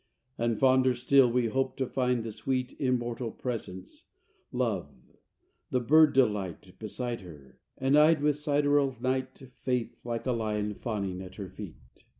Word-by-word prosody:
III 115 - 0
And, 115 -2 0
fonder 130 -1 +4
still, 125 0 +4
we 125 0 +2
hoped 130 +3 -1
to 130 - 0
find 125 -2 0
the 115 - -5
sweet 125 +4 -2
Immortal 120 -2 -1
presence, 105 -6 -6 0.5
Love; 110 - -1 0.8
the 125 - +1
bird 155 +5 +5
Delight 105 -8 0
Beside 120 +2 -4
her; 75 -8 -14 0.2
and, 135 +2 +2
eyed 155 +1 +6
with 150 0 +2
sideral 145 -3 +1
night, 130 +1 -1 0.2
Faith, 120 -3 -3
like 120 -1 -4
a 130 - +1
lion, 105 -3 -1
fawning 100 -4 -4
at 95 -1 -10
her 100 -3 -7
feet. 95 -4 -8
120 Hz, 150 wpm, -29 LUFS, 105-130 Hz, 0.8 s, eyed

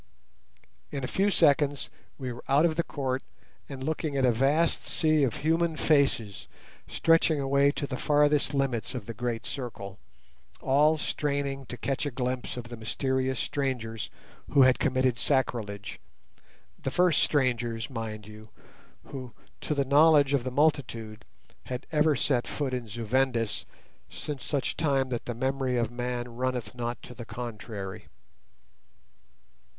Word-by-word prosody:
In 140 -2 -4
a - - -1
few 195 +8 +2
seconds 145 -6 +3 0.3
we 130 -3 -4
were 120 - -10
out 140 +4 +5
of 160 -2 +1
the 170 - +2
court 135 -5 -2 0.5
and 135 -2 -6
looking 155 -1 -2
at 135 - +3
a 125 - +5
vast 140 +8 +2
sea 155 -1 +3
of 130 -6 +1
human 165 0 +2
faces 135 -9 +1 0.4
stretching 165 -2 +3
away 140 +1 +3
to 145 - -2
the 130 -2 -4
farthest 145 0 +2
limits 135 -3 -1
of 120 -5 -5
the 115 - -6
great 120 0 -3
circle, 100 -7 -6 0.6
all 150 +4 +4
straining 140 -3 -2
to 125 - -6
catch 135 +3 -1
a - - 0
glimpse 125 -1 -3
of 120 -1 -6
the 120 - -7
mysterious 130 +3 -1
strangers 120 -6 -2 0.4
who 140 - +6
had 130 -1 +5
committed 130 -2 +1
sacrilege; 115 -7 -1 0.8
the - - -1
first 175 +3 +3
strangers, 120 -5 +1
mind 110 -4 -5
you, 105 +1 -12 0.5
who, 130 -4 -8 0.3
to 150 - -2
the 140 -1 +1
knowledge 145 0 +5
of 135 -4 +2
the 130 - -2
multitude, 120 -6 0 0.4
had 125 +1 -5
ever 155 -1 +3
set 125 -2 +1
foot 140 -3 -2
in 125 -2 -3
Zu 115 +2 -5
Vendis 120 -2 0 0.4
since 145 -3 -5
such 140 -3 -1
time 135 -4 +1
that 120 -2 -3
the 120 - -4
memory 130 0 0
of 115 -1 0
man 120 0 -3
runneth 125 -1 -2
not 120 -1 -3
to 125 - -9
the 120 - -8
contrary. 110 -4 -6
130 Hz, 150 wpm, -28 LUFS, 120-145 Hz, 0.8 s, who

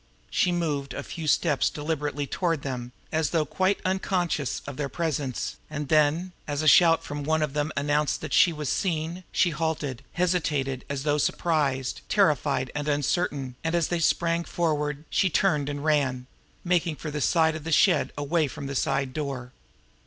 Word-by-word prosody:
She 180 - +2
moved 150 -6 -2
a 140 - -4
few 160 +1 -6
steps 150 -1 +2
deliberately 150 -1 -2
toward 165 0 -1
them, 125 -3 -4 0.2
as 160 -2 +1
though 160 -1 +1
quite 190 +5 +1
unconscious 185 -6 -1
of 140 - -6
their 145 -1 -3
presence; 145 -6 -2
and 150 -2 -4
then, 155 +4 +3 0.2
as 145 +1 -2
a - - +1
shout 165 +1 +6
from 145 0 -5
one 160 +1 +1
of 150 -2 -2
them 150 +1 -1
announced 145 +1 +1
that - - -5
she 175 - +6
was 150 -2 -5
seen, 170 +2 -1
she 175 -4 +2
halted, 150 -5 -2
hesitated 150 -7 0
as 140 -1 -3
though 150 0 +1
surprised, 140 -5 0
terrified - - +2
and 145 0 -3
uncertain, 145 -2 0
and, 165 +1 0
as 170 -2 +1
they 175 - 0
sprang 170 +1 +1
forward, 150 -3 -1
she 190 - +3
turned 150 -5 +1
and 145 +1 -4
ran 135 -5 +1 0.4
making 175 -2 +1
for 155 0 -6
the 150 0 -3
side 160 0 +3
of 155 - -6
the 165 - -4
shed - - +4
away 150 +2 +1
from 140 +2 -7
the 140 - -4
side 135 0 0
door. 135 -4 -4
150 Hz, 175 wpm, -26 LUFS, 140-165 Hz, 0.4 s, shout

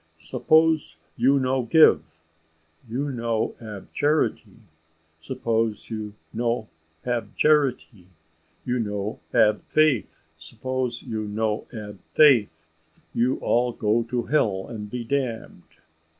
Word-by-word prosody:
Suppose 155 - +2 0.2
you 135 +4 +3
no 130 0 +1
give 120 - +5 0.9
you 140 +5 -2
no 115 -3 -1
ab 105 -4 -9
charity; 145 -8 0 0.6
suppose 115 +6 -2
you 105 -2 -5 0.2
no 115 -1 -1 0.4
ab 120 -4 -2
charity 135 - +1 0.6
you 125 0 0
no 105 -1 -3
ab 110 -3 +3
faith; 155 -6 +1 0.2
suppose 125 +9 -4
you 110 -1 -4
no 105 +1 -2
ab 105 -4 -8 0.2
faith 105 - +4 0.5
you 125 +3 +1
all 120 +1 +2
go 110 +1 +1
to 120 +1 -2
hell 105 -9 +1
and 105 -3 -7
be 125 +2 -4
damned. 115 -10 -4
115 Hz, 110 wpm, -24 LUFS, 105-130 Hz, 0.9 s, give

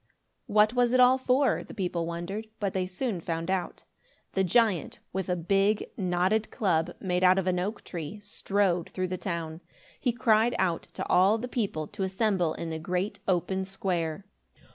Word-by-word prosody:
What 210 +2 +4
was 245 -1 +2
it 255 - +4
all 250 +1 +6
for? 260 +1 +2
The - - -11
people 175 -4 -2
wondered, 175 +6 -4
but 200 -2 -1
they 185 -1 -1
soon 190 0 -3
found 165 +2 -2
out. 185 -2 -2 0.5
The 190 - +1
giant, 205 - +2 0.2
with 190 -1 -2
a 180 - +2
big 195 +4 +2
knotted 185 +3 +1
club, 175 -4 0
made 180 -1 -1
out 185 +1 +6
of 190 - +1
an 180 -1 +1
oak 200 +5 -3
tree, 170 +3 -6
strode 200 -3 0
through 185 -1 -3
the 185 0 -3
town. 165 -3 -4 0.4
He 250 - +1
cried 225 0 +3
out 180 -3 0
to - - -4
all 195 +4 +4
the 240 +3 -4
people 200 -11 -2
to 205 - -8
assemble 190 -3 +1
in 165 - -5
the 160 - -3
great 185 +4 -2
open 190 +1 +1
square. 185 -2 -2
190 Hz, 180 wpm, -28 LUFS, 175-215 Hz, 0.5 s, all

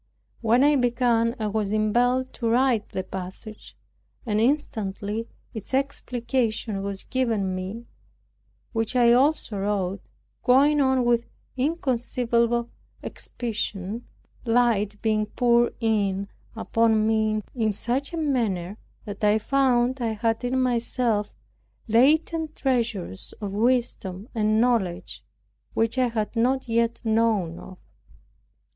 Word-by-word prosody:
When 235 +3 +4
I 295 0 +5
began 240 -1 +2
I 220 - -3
was 210 -1 -1
impelled 240 +5 +1
to 230 -2 -2
write 240 -2 +2
the 190 - -3
passage, 190 +4 -8 0.5
and 210 -2 0
instantly 220 -5 -1 0.3
its 220 +4 -4
explication 240 -5 -1
was 195 -1 -4
given 225 -7 -1
me, 190 +6 -5 0.9
which 225 +2 -1
I 240 -1 +5
also 255 -5 +2
wrote, 195 -1 -1 0.4
going 285 +4 +4
on 265 -2 +2
with 235 -1 +2 0.3
inconceivable 240 -4 0 0.3
expedition, 215 -2 -4 0.4
light 225 -4 +1
being 215 -1 +1
poured 240 +1 +2
in 200 -4 0 0.3
upon 225 -1 +2
me 215 -1 +1
in 220 -4 +1
such 245 +7 -1
a 335 - -4
manner, 220 - -1 0.3
that 205 -1 -7
I 210 +1 +4
found 255 +1 +1
I 225 -2 0
had 225 +2 -1
in 255 +1 0
myself 235 -3 0 0.6
latent 310 +7 +2
treasures 230 - -2
of 205 -2 -4
wisdom 215 -3 -1
and 215 -1 +2
knowledge 225 -8 0 0.5
which 225 +3 +1
I 255 - +3
had 225 -1 -3
not 255 +3 +1
yet 230 0 +1
known 220 -7 +1
of. 185 - -11
230 Hz, 115 wpm, -25 LUFS, 210-250 Hz, 0.9 s, I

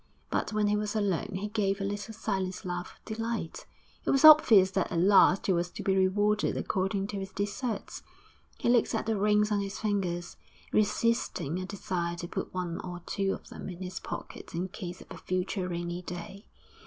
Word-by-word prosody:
But - - 0
when 215 -1 +1
he 205 0 +2
was 210 +1 -2
alone 200 -2 0
he 195 +2 -2
gave 205 -2 0
a - - -2
little 205 +2 -3
silent 190 -5 -3
laugh 175 0 -5
of - - -34
delight. 225 -6 -4 0.4
It - - -3
was 275 +3 +5
obvious 225 -12 +9
that 190 -1 0
at 170 - 0
last 195 +2 +5
he 195 - +3
was 175 0 0
to - - -7
be 190 - +2
rewarded 205 +3 +2
according 195 0 -1
to 200 - -3
his 195 0 -6
deserts. 205 +2 -3 0.6
He - - -2
looked 240 -1 +3
at - - -1
the 225 0 +1
rings 210 +1 +3
on 205 - +2
his 195 0 -4
fingers, 180 -5 -2 0.4
resisting 210 - +1
a 185 - -5
desire 175 -3 -3
to 175 0 -6
put - - -4
one 180 -2 -3
or 175 -1 -7
two 195 -1 0
of - - -9
them - - -7
in 180 0 -7
his 185 +1 -5
pocket - - -7
in 180 +3 -2
case 185 -2 -7
of - - -13
a - - -7
future 185 0 -2
rainy 175 0 -3
day. 180 +3 -8
195 Hz, 200 wpm, -29 LUFS, 180-210 Hz, 0.6 s, obvious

